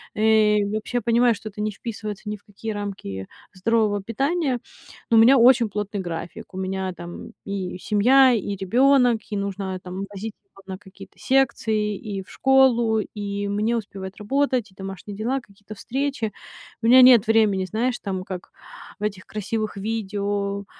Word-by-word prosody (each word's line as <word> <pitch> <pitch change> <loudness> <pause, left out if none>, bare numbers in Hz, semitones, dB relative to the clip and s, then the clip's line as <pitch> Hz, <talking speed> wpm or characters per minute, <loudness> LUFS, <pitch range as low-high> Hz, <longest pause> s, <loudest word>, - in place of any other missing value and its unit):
Э, 215 -1 +4 0.2
вообще 215 +3 -2
я - - 0
понимаю, 235 +1 +3
что 215 - -10
это 210 0 -7
не 215 0 -1
вписывается 210 -1 -7
ни 210 - -2
в 200 - -30
какие 215 +2 -7
рамки 190 - -5 0.3
здорового 205 +1 +1
питания. 270 - -1 0.5
Но - - +5
у - - +8
меня 255 +4 +7
очень 240 -1 +5
плотный 205 0 -3
график. 170 0 -7
У - - -7
меня 190 0 -2
там: 175 0 -9
и 195 -2 -4
семья, 250 +7 +5
и 205 -3 -2
ребёнок, 245 +3 +3
и 205 - -1
нужно, 195 -1 -3
там, 185 +1 -6
возить 210 +2 -6
его 195 0 -20
на 190 -1 -5
какие-то 195 0 -15
секции, 220 -5 +1
и 195 -2 -6
в - - -22
школу, 245 -4 +3
и 205 -1 -4
мне 215 +4 0
успевать 195 -3 -7
работать, 255 +1 0
и - - -25
домашние 195 +1 -7
дела, 245 +6 -1
какие-то 205 -1 -13
встречи. 260 -2 -3 0.5
У 225 - 0
меня 255 +2 +8
нет 250 -4 +8
времени, 215 -4 +3
знаешь 230 +6 -1
там, 190 -2 -4
как 185 -2 -7 0.5
в - - -7
этих 200 -3 -3
красивых 215 0 -4
видео, 200 -1 -2
210 Hz, 165 wpm, -23 LUFS, 195-230 Hz, 0.5 s, у